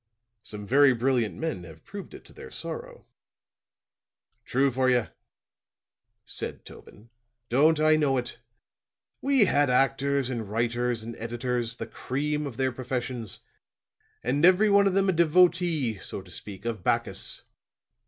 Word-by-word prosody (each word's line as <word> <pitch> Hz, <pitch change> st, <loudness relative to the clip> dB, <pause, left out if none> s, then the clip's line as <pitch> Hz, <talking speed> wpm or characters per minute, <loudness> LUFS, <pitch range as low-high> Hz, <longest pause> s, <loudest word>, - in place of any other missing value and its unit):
"Some 105 Hz, -2 st, -6 dB
very 135 Hz, +4 st, +5 dB
brilliant 120 Hz, -2 st, +1 dB
men 160 Hz, -, -3 dB
have 80 Hz, -2 st, -13 dB
proved 200 Hz, 0 st, -9 dB
it -, -, -13 dB
to -, -, -16 dB
their -, -, -11 dB
sorrow." 485 Hz, 0 st, -6 dB, 1.4 s
"True 135 Hz, +1 st, +2 dB
for 130 Hz, +1 st, +1 dB
ye," 125 Hz, -3 st, +2 dB, 1.2 s
said -, -, -6 dB
Tobin. 115 Hz, +3 st, -14 dB, 0.4 s
"Don't 150 Hz, +6 st, +4 dB
I 155 Hz, 0 st, +5 dB
know 140 Hz, -3 st, +2 dB
it? 125 Hz, -1 st, -4 dB, 0.8 s
We 270 Hz, -5 st, +4 dB
had 145 Hz, -6 st, +2 dB
actors 135 Hz, +1 st, +1 dB
and 115 Hz, -5 st, -4 dB
writers 120 Hz, +1 st, -1 dB
and 115 Hz, +1 st, -7 dB
editors 120 Hz, 0 st, -3 dB
the -, -, -5 dB
cream 150 Hz, +3 st, -3 dB
of 120 Hz, -4 st, -8 dB
their 130 Hz, 0 st, +1 dB
professions 125 Hz, -3 st, -4 dB, 0.8 s
and 135 Hz, +6 st, 0 dB
every 185 Hz, +4 st, +6 dB
one 200 Hz, 0 st, +5 dB
of 190 Hz, -, 0 dB
them 195 Hz, 0 st, +3 dB
a -, -, +4 dB
devotee, 170 Hz, -, +3 dB
so -, -, -6 dB
to -, -, -14 dB
speak, 100 Hz, 0 st, -9 dB
of 110 Hz, -6 st, -3 dB
Bacchus. -, -, -1 dB
130 Hz, 145 wpm, -27 LUFS, 120-155 Hz, 1.4 s, every